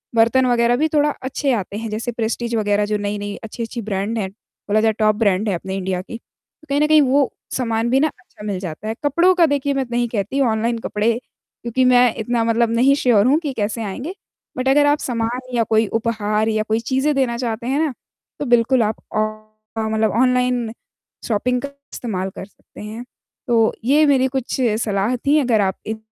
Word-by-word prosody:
बर्तन 235 Hz, +3 st, +4 dB
वगैरह 240 Hz, -1 st, +3 dB
भी 310 Hz, +4 st, +2 dB
थोड़ा 295 Hz, 0 st, +3 dB
अच्छे 270 Hz, +1 st, -1 dB
आते 200 Hz, -2 st, -3 dB
हैं, 225 Hz, 0 st, -4 dB
जैसे 225 Hz, +3 st, -3 dB
प्रेस्टीज 235 Hz, +1 st, -2 dB
वगैरह, 205 Hz, -1 st, +1 dB
जो 210 Hz, 0 st, -1 dB
नई-नई 205 Hz, 0 st, -3 dB
अच्छी-अच्छी 230 Hz, +1 st, -5 dB
ब्रैन्ड 205 Hz, +2 st, -2 dB
हैं। 190 Hz, -2 st, -2 dB
बोला 210 Hz, +1 st, -3 dB
जाए, 220 Hz, -1 st, +3 dB
टॉप 215 Hz, -1 st, +3 dB
ब्रैन्ड 210 Hz, -1 st, +1 dB
है 195 Hz, -, 0 dB
अपने 190 Hz, +2 st, -5 dB
इंडिया 185 Hz, -1 st, -2 dB
की। 225 Hz, +4 st, -8 dB, 0.5 s
कहीं 280 Hz, +1 st, +1 dB
न 300 Hz, -, +4 dB
कहीं, 310 Hz, -1 st, +6 dB
वो 275 Hz, 0 st, +2 dB, 0.3 s
सामान 230 Hz, -2 st, 0 dB
भी 260 Hz, +2 st, +3 dB
ना, 305 Hz, -, +3 dB
अच्छा 245 Hz, -7 st, -13 dB
मिल 195 Hz, -3 st, -2 dB
जाता 180 Hz, +3 st, -6 dB
है। 220 Hz, -, -2 dB
कपड़ों 340 Hz, +6 st, +4 dB
का, 345 Hz, -2 st, +5 dB
देखिए, 285 Hz, -1 st, 0 dB
मैं 270 Hz, -1 st, -1 dB
नहीं 240 Hz, 0 st, +1 dB
कहती 225 Hz, +6 st, -1 dB
ऑनलाइन 230 Hz, -1 st, +1 dB
कपड़े, 215 Hz, +1 st, 0 dB, 0.5 s
क्योंकि 240 Hz, +2 st, 0 dB
मैं 250 Hz, -2 st, +5 dB
इतना 230 Hz, +1 st, -1 dB
मतलब 230 Hz, 0 st, +2 dB
नहीं 270 Hz, +4 st, +4 dB
श्योर 230 Hz, -7 st, +3 dB
हूँ 285 Hz, +4 st, +4 dB
कि 295 Hz, -5 st, -4 dB
कैसे 220 Hz, 0 st, -2 dB
आएँगे। 255 Hz, -, -5 dB, 0.4 s
बट 255 Hz, +1 st, -1 dB
अगर 290 Hz, +2 st, +5 dB
आप 290 Hz, +1 st, +3 dB
सामान 245 Hz, +1 st, -3 dB
या 235 Hz, -, +3 dB
कोई 220 Hz, -1 st, +3 dB
उपहार 215 Hz, -1 st, 0 dB
या 215 Hz, -1 st, 0 dB
कोई 220 Hz, +1 st, +1 dB
चीज़ें 270 Hz, +3 st, +2 dB
देना 245 Hz, -3 st, +1 dB
चाहते 235 Hz, -1 st, -3 dB
हैं 275 Hz, +3 st, +1 dB
ना, 300 Hz, -5 st, -1 dB, 0.5 s
तो 290 Hz, -, -2 dB
बिल्कुल 240 Hz, 0 st, +3 dB
आप 215 Hz, 0 st, -2 dB
ऑ -, -, +2 dB, 0.6 s
ऑ 220 Hz, -, -1 dB
मतलब 220 Hz, -1 st, +1 dB
ऑनलाइन 250 Hz, -2 st, +1 dB, 0.6 s
शॉपिंग 245 Hz, +3 st, 0 dB
का 280 Hz, -, -5 dB, 0.2 s
इस्तेमाल 190 Hz, -5 st, -3 dB
कर -, -, -7 dB
सकते 205 Hz, -, -16 dB
हैं। 215 Hz, +3 st, -7 dB, 0.4 s
तो 230 Hz, -2 st, +3 dB
ये 295 Hz, +5 st, +5 dB
मेरी 270 Hz, -3 st, +3 dB
कुछ 265 Hz, -1 st, -3 dB, 0.2 s
सलाह 210 Hz, +2 st, 0 dB
थी, 285 Hz, +5 st, +2 dB
अगर 240 Hz, -6 st, +2 dB
आप 190 Hz, -1 st, 0 dB
इन 220 Hz, 0 st, -4 dB
230 Hz, 200 wpm, -20 LUFS, 215-260 Hz, 0.6 s, कहीं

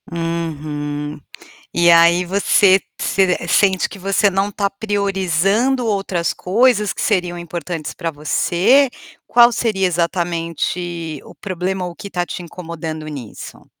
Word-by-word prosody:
Uhum. 150 Hz, -3 st, -4 dB, 0.5 s
E 175 Hz, 0 st, +4 dB
aí 170 Hz, +1 st, +5 dB
você 195 Hz, +1 st, +4 dB, 0.2 s
se 190 Hz, -2 st, +2 dB
sente 190 Hz, 0 st, +3 dB
que -, -, -10 dB
você 195 Hz, +2 st, +2 dB
não 195 Hz, +1 st, 0 dB
está 200 Hz, -1 st, -1 dB
priorizando 200 Hz, +4 st, 0 dB
outras 195 Hz, -5 st, -1 dB
coisas 210 Hz, +2 st, +2 dB
que -, -, -6 dB
seriam 180 Hz, -5 st, 0 dB
importantes 170 Hz, -1 st, -5 dB
pra 165 Hz, -2 st, -4 dB
você? 175 Hz, -, +2 dB, 0.4 s
Qual 240 Hz, 0 st, +6 dB
seria 215 Hz, -5 st, 0 dB
exatamente 170 Hz, -1 st, -2 dB
o -, -, -13 dB
problema 185 Hz, 0 st, -3 dB
ou 175 Hz, -, -5 dB
o -, -, -15 dB
que 200 Hz, -, -8 dB
está 175 Hz, -2 st, -2 dB
te 180 Hz, -, -6 dB
incomodando 165 Hz, -2 st, -7 dB
nisso? 135 Hz, -8 st, -9 dB
180 Hz, 130 wpm, -19 LUFS, 165-195 Hz, 0.5 s, Qual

